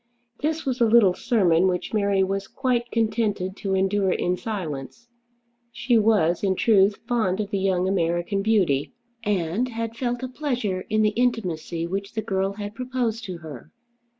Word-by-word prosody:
This 315 +2 -1
was 255 -2 -2
a 235 - +6
little 215 -5 +5
sermon 185 -5 +2
which 180 +3 -2
Mary 200 -2 +2
was 195 +1 -2
quite 245 -3 -1
contented 215 -5 0
to 195 -1 -1
endure 195 0 +1
in 180 0 0
silence. 185 - -6 0.6
She 235 0 +2
was, 200 -6 +2
in 190 -1 +2
truth, 200 -1 +4
fond 220 -6 0
of 205 -1 -3
the 200 - 0
young 190 -1 +1
American 175 +1 0
beauty, 190 -10 +1 0.3
and 205 +3 0
had 230 -1 -4
felt 245 0 -2
a - - -1
pleasure 250 -9 -2
in 215 0 +2
the 215 - +4
intimacy 195 -8 -1
which 195 +3 -4
the 220 - -3
girl 195 -1 -1
had 205 0 -6
proposed 240 -2 -2
to 185 -4 -5
her. 145 -6 -10
205 Hz, 165 wpm, -24 LUFS, 185-230 Hz, 0.6 s, a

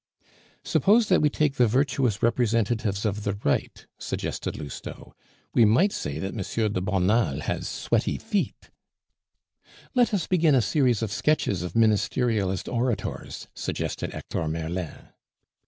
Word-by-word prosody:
"Suppose 215 +2 +3
that 185 - +4
we 150 - +4
take 145 -1 0
the 125 - +5
virtuous 125 -3 +1
representatives 115 -3 +1
of 105 0 -1
the 100 -1 -1
Right?" 70 - -1
suggested - - -4
Lousteau. 70 - -8 0.4
"We 120 - +5
might 120 - +4
say 70 - -4
that 95 +4 -4
M. 110 +1 -1
de 95 - -1
Bonald 95 - +1
has - - -2
sweaty - - 0
feet." 210 -3 -3 1.2
"Let 245 -2 +3
us 195 -6 0
begin 165 -5 +3
a 130 - +4
series 125 -6 +2
of 110 - -2
sketches 115 - +1
of 90 - -5
Ministerialist 110 -2 +1
orators," 120 -1 -3
suggested - - -4
Hector 80 - -4
Merlin. 80 +1 -4
115 Hz, 135 wpm, -26 LUFS, 95-135 Hz, 1.2 s, the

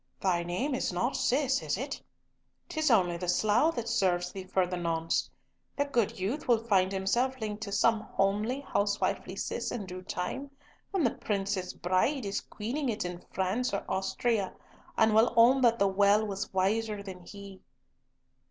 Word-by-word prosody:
Thy 180 -3 +1
name 180 +12 -2
is 255 - -1
not 235 +9 -1
Cis, 270 +1 +1
is - - -1
it? - - -4 0.7
'Tis 315 -4 0
only 180 -7 +3
the 180 +1 -5
slough 220 - +3
that 235 -1 -3
serves 180 -6 +1
thee 190 -1 -7
for 185 0 +1
the 180 +1 -4
nonce. 165 -2 -1 0.5
The 285 - +2
good 240 -9 0
youth 220 +11 -2
will 240 -2 +5
find 195 -4 +2
himself 235 +7 0
linked 215 -1 -4
to 200 - -5
some 225 +2 +3
homely, 215 +6 0
housewifely 205 -6 -1
Cis - - -3
in 215 -5 -4
due 185 0 -7
time, 195 +10 -4 0.4
when 385 -5 0
the 240 - +3
Princess 195 -2 -2
Bride 195 +9 0
is 200 0 -2
queening 250 +6 -3
it 210 -5 -2
in 175 0 -6
France 200 +5 0
or - - -4
Austria, 195 +1 -1 0.4
and 220 -1 +4
will 220 +2 +4
own 250 +4 +6
that 235 -2 +4
the 200 - +3
well 200 +2 +4
was 200 0 -4
wiser 205 +2 0
than 190 -2 -8
he." 200 +1 -11
205 Hz, 170 wpm, -30 LUFS, 190-240 Hz, 0.7 s, own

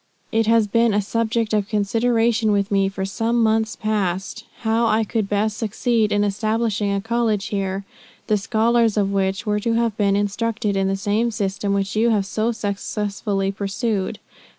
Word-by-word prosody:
It 225 0 +1
has 225 -1 +4
been 230 +1 +2
a - - +3
subject 230 +1 -1
of 205 -2 +1
consideration 225 +1 +1
with 200 0 0
me, 195 -1 +2
for 195 0 -4
some 230 +4 0
months 220 0 +1
past, 200 0 -2 0.2
how 225 0 +2
I 220 0 +2
could 215 -1 -2
best 210 +1 0
succeed 225 0 0
in 205 0 +2
establishing 215 0 0
a 200 - 0
college 225 -1 0
here, 195 -1 -2 0.4
the 215 - +2
scholars 225 +1 +2
of 200 -1 +1
which 195 -1 -1
were 210 -1 +1
to 230 +2 0
have 230 -2 +1
been 200 -2 +2
instructed 210 +1 -1
in 195 0 +1
the 195 0 0
same 210 +4 0
system 200 -2 -2
which 200 +1 -1
you 225 +2 +3
have 210 -4 +2
so 220 +4 -1
successfully 200 -2 -2
pursued. 200 0 -2
210 Hz, 175 wpm, -21 LUFS, 200-225 Hz, 0.4 s, has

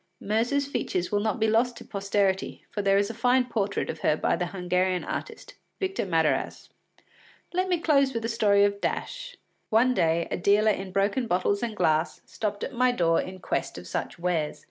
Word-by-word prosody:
Myrza’s 235 +7 0
features 180 -10 -2
will 205 - +2
not 220 +3 -1
be 220 - +2
lost 235 +2 +2
to - - -11
posterity, 195 -1 -1
for 210 - -2
there 195 0 +3
is 200 +2 +1
a - - -9
fine 250 +2 +2
portrait 210 -5 -1
of 160 - -5
her 155 0 +2
by - - +1
the 175 - -2
Hungarian 180 0 0
artist, - - -6 0.3
Victor 380 - -2
Madarasz. 165 -3 0 0.8
Let 370 +1 0
me 355 - +2
close 280 -5 +3
with 230 -3 -3
the - - -1
story 210 -3 +3
of 200 0 +1
Dash. - - -4 0.3
One 240 +4 +4
day 165 -5 +1
a - - -1
dealer 205 +4 +4
in 195 -1 -4
broken 200 +6 0
bottles 195 +1 +1
and 230 -3 -3
glass 155 +1 +1
stopped 210 -2 -4
at 275 - -4
my 250 +1 +3
door 165 -7 +2
in 185 0 -7
quest - - -2
of 90 - -9
such 90 - -4
wares. 170 -3 -1
205 Hz, 195 wpm, -26 LUFS, 180-240 Hz, 0.8 s, One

